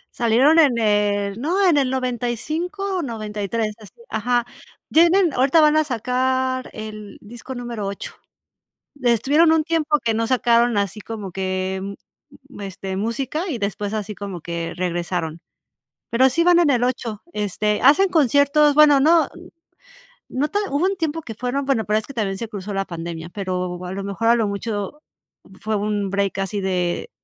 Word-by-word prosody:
Salieron 250 +7 +4
en 280 -7 +4
el 205 -1 +1
no, 370 +7 +2
en 345 - +4
el 275 -3 +2
95 265 - -2
o - - -1
93, 215 - -3
así. 210 - -15
Ajá. 240 +2 0 0.5
Tienen 340 +1 +4
ahorita 270 +5 +3
van 305 -1 +5
a 310 - +4
sacar 255 0 -1
el 215 -2 -8
disco 240 +4 -9
número 235 -4 -5
8, 200 - -6 0.9
estuvieron 265 +7 +4
un 320 -1 +3
tiempo 315 -2 +1
que 225 - +2
no 225 +1 0
sacaron 235 -2 +3
así 200 +1 -2
como 210 -3 -7
que, 185 0 -2
mm, 200 +1 -5 0.6
mm, - - -9
este, 195 -1 -5
música 265 - -2
y 265 - -2
después 205 0 -3
así 210 0 -4
como 195 -4 -7
que 170 0 -4
regresaron, 175 -2 -3 0.7
pero 260 +3 +4
sí. 335 +6 +1
van 350 0 +5
en 345 -3 +4
el 245 -3 +2
8. 235 -4 -3
Este, 210 +1 -1
hacen 315 +8 +5
conciertos, 290 -1 +4
bueno 295 -2 +6
no, 320 +1 +4 1.0
no 280 +3 -1
ta 410 - 0
hubo 285 +4 0
un 390 -1 -2
tiempo 325 0 -2
que 225 -7 -8
fueron, 250 +4 -2
bueno, 265 -6 0
pero 215 +1 +2
es - - -10
que 275 - -10
también 200 -5 -2
se 230 0 -5
cruzó 205 -1 -6
la 195 - 0
pandemia 170 -2 -6
pero, 180 -2 -4
a 180 - -5
lo 195 +1 -4
mejor, 200 +3 -2
a 235 - +6
lo 225 - +1
mucho, 205 +5 -4 0.6
fue 215 0 -1
un 205 -1 -1
break 200 0 -1
así 195 +1 -2
de 185 - -1
230 Hz, 170 wpm, -21 LUFS, 200-280 Hz, 1.0 s, bueno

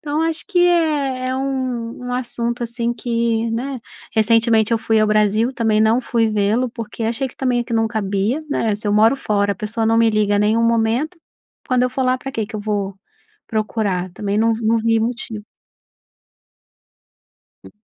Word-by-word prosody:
Então, 300 +1 -2
acho 325 0 -1
que 380 -3 0
é 290 -7 +1
é 260 - -1
um 255 -4 -3
um 245 - -4
assunto, 240 -1 -2
assim, 235 0 -2
que 230 -1 -1
né. 260 +1 -4 0.3
Recentemente 225 0 +3
eu 230 - +3
fui 220 0 +2
ao 215 - +3
Brasil, 215 +2 +2
também 225 -4 +1
não 220 +2 +4
fui 235 -3 +1
vê-lo, 215 +4 +1
porque 230 -1 -7
achei 235 +4 -1
que 255 - -12
também, 250 -2 0
eh, - - -3
que 235 - -8
não 225 0 +2
cabia, 210 +3 -1
né? 220 -6 0
Se 210 +1 -7
eu 205 - +1
moro 220 +5 +4
fora, 205 -5 0
a - - -7
pessoa 220 +3 -2
não 225 0 +3
me 230 -1 +4
liga 210 -1 +1
em - - +2
nenhum 215 +3 +2
momento, 230 +8 +1 0.5
quando 250 -1 +2
eu - - +1
for 260 +1 -1
lá, 255 0 +2
pra 270 - -6
quê 225 -4 -2
que 215 +1 -12
eu 210 - -3
vou 205 -2 -2 0.5
procurar? 210 -4 -1
Também 205 +1 -3
não 225 +1 +3
vi 220 0 -4
não 230 - +3
vi 225 0 +2
motivo. 225 -2 -4 2.2
E - - -12
230 Hz, 195 wpm, -19 LUFS, 215-250 Hz, 2.2 s, não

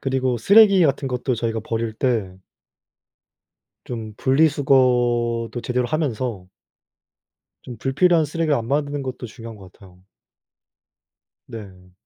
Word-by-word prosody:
그리고 130 -2 -1
쓰레기 200 - +6
같은 140 -1 0
것도 125 0 -2
저희가 115 -1 -2
버릴 115 0 -3
때 110 -6 -2 1.5
좀 110 -3 -7
분리수거도 125 -5 +2
제대로 125 0 -1
하면서 125 - -3 1.1
좀 120 -3 -9
불필요한 160 +7 +2
쓰레기를 155 0 -1
안 115 -1 -3
만드는 145 +1 -1
것도 130 -1 -6
중요한 115 0 -10
것 95 -2 -14
같아요. 90 -2 -19 1.5
네. 95 -5 -12
125 Hz, 255 characters per minute, -21 LUFS, 115-140 Hz, 1.5 s, 쓰레기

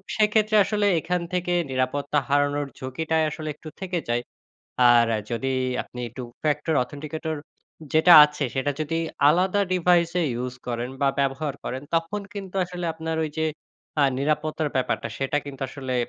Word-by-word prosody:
সেক্ষেত্রে 215 0 +3
আসলে 210 -1 0
এখান 180 +2 -1
থেকে 180 0 -1 0.2
নিরাপত্তা 135 +3 0
হারানোর 145 0 +1
ঝুঁকিটাই 160 +5 -1
আসলে 155 +1 -6
একটু 155 - -10
থেকে 180 -2 -2
যায়। 120 0 +1 0.7
আর 120 -1 +6 0.2
যদি 130 +3 -1 0.3
আপনি 125 - -10 0.2
Two-factor 150 +5 -2
authenticator 155 +4 -5 0.6
যেটা 160 +3 +6
আছে, 150 -1 -2
সেটা 135 +2 0
যদি 155 +2 -1 0.3
আলাদা 185 +5 +3
device 175 -1 +3
এ - - +2 0.2
use 125 0 -5
করেন, 120 0 -2
বা 140 - +3
ব্যবহার 140 +1 -1
করেন, 130 +1 -4
তখন 165 +5 0
কিন্তু 195 -2 -7
আসলে 180 0 -6
আপনার 160 0 -3
ঐ - - -1
যে 160 - +2 0.6
আ - - +6
নিরাপত্তার 155 +1 0
ব্যাপারটা, 130 - -1
সেটা 135 +1 0
কিন্তু 140 -2 -7
আসলে 130 -2 -5
150 Hz, 150 wpm, -25 LUFS, 135-170 Hz, 0.7 s, আর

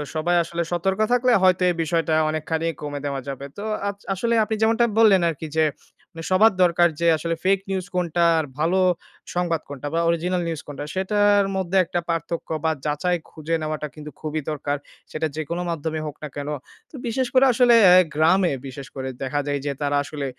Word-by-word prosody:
সবাই 175 +3 +1
আসলে 170 +1 -4
সতর্ক 190 +4 0
থাকলে 250 0 +3
হয়তো 185 -1 +4
এই 175 - 0
বিষয়টা 165 0 0 0.2
অনেকখানি 160 +1 -2
কমে 145 -1 -4
দেওয়া 140 -1 -2
যাবে। 140 0 -5
তো 200 - -6 0.2
আস 200 0 -3 0.2
আসলে 235 +5 -1
আপনি 220 +1 -2
যেমনটা 225 +2 +3
বললেন 200 -5 +6
আরকি 160 0 -5
যে 160 - +4 0.7
সবার 215 +3 +5
দরকার 175 0 +4
যে 170 - +2
আসলে 165 +2 -2
ফেইক 195 +1 +3
নিউজ 190 -2 -2
কোনটা 175 -1 +1 0.2
আর 160 - -1
ভালো 170 +5 +2 0.6
সংবাদ 170 -3 0
কোনটা 145 0 -6
বা 165 - +1
অরিজিনাল 175 +2 0
নিউজ 160 -3 -3
কোনটা 145 0 -6
সেটার 205 +1 +3
মধ্যে 190 0 0
একটা 175 - -2
পার্থক্য 165 0 -3 0.2
বা 160 - +3
যাচাই 175 +4 0
খুঁজে 160 +1 -3
নেওয়াটা 155 -1 -3
কিন্তু 150 0 -9
খুবই 155 0 -3
দরকার। 145 -1 -2 0.3
সেটা 155 +1 -1
যেকোনো 160 +3 -3
মাধ্যমে 160 -1 -3
হোক 150 -1 -6
না - - -3
কেন। 145 0 -5 0.4
তো - - -12
বিশেষ 250 +2 0
করে 260 +1 +6
আসলে 240 -1 +5 0.4
গ্রামে 175 +4 +3 0.2
বিশেষ 135 +1 -8
করে 130 -1 -4
দেখা 135 +2 -1
যায় 145 0 -1
যে 145 - 0
তারা 145 0 0
আসলে 145 -1 -5
165 Hz, 185 wpm, -23 LUFS, 150-190 Hz, 0.7 s, বললেন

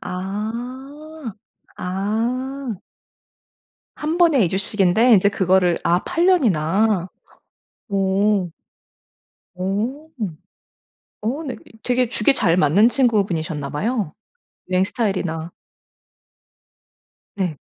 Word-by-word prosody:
아. 240 +9 -6 0.4
아. 230 +7 -2 1.2
1 310 +3 -2
번에 315 - +5
2 - - +1
주씩인데 200 +4 +3
이제 200 +1 +5
그거를 185 -3 +2
아 175 +1 +3
8 345 +2 +1
년이나. 205 - +2 0.8
오. 195 -1 +1 1.0
오. 220 - -3 1.1
어 255 +9 -2
네 270 -5 -4 0.3
되게 250 0 +2
죽이 240 +2 +2
잘 190 -10 +2
맞는 185 +8 +5
친구분이셨나 185 - 0
봐요, 205 0 -1 0.6
여행 185 0 +3
스타일이나? 185 -7 -2 1.8
네. 180 -7 -2
210 Hz, 150 characters per minute, -21 LUFS, 185-255 Hz, 1.8 s, 번에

